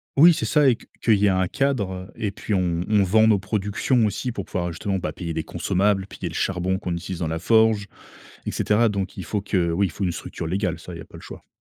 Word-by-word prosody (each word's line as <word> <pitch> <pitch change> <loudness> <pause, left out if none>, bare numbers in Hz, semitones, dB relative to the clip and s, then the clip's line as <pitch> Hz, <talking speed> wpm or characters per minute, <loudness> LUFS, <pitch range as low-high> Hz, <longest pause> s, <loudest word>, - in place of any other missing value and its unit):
Oui, 165 +5 +8
c'est - - -2
ça 150 -3 +4
et 125 - +3
que - - -18 0.2
qu'il 110 -3 +4
y 100 - +2
ait - - +5
un 95 -1 +2
cadre 100 -9 -1
et 105 - -2
puis, 105 +2 -4
on 90 -2 +1
on 105 -1 +3
vend 110 +4 +4
nos 105 -3 +4
productions 105 +4 0
aussi 120 +4 -2
pour 100 -5 -5
pouvoir 90 -1 -3
justement, 95 +3 -2
bah, 75 - -3
payer 85 +1 -5
des 80 - -2
consommables, 95 +3 0
payer 95 -3 -6
le 85 - -9
charbon 95 0 0
qu'on 90 - -4
utilise 85 +1 -5
dans 80 - -1
la 80 +1 -2
forge 110 0 +3 0.6
et - - -2
cetera, 110 +2 +2
donc 100 -2 -3
il 95 - -6
faut 105 +5 -2
que 90 -4 0
oui, 95 +3 +2
il - - -8
faut 100 - -5
une 90 - +1
structure 85 - -6
légale, 90 -1 -1
ça, 90 +1 -9
il - - -7
y - - -9
a - - -10
pas - - -16
le - - -10
choix. - - -11
95 Hz, 270 wpm, -23 LUFS, 90-105 Hz, 0.6 s, Oui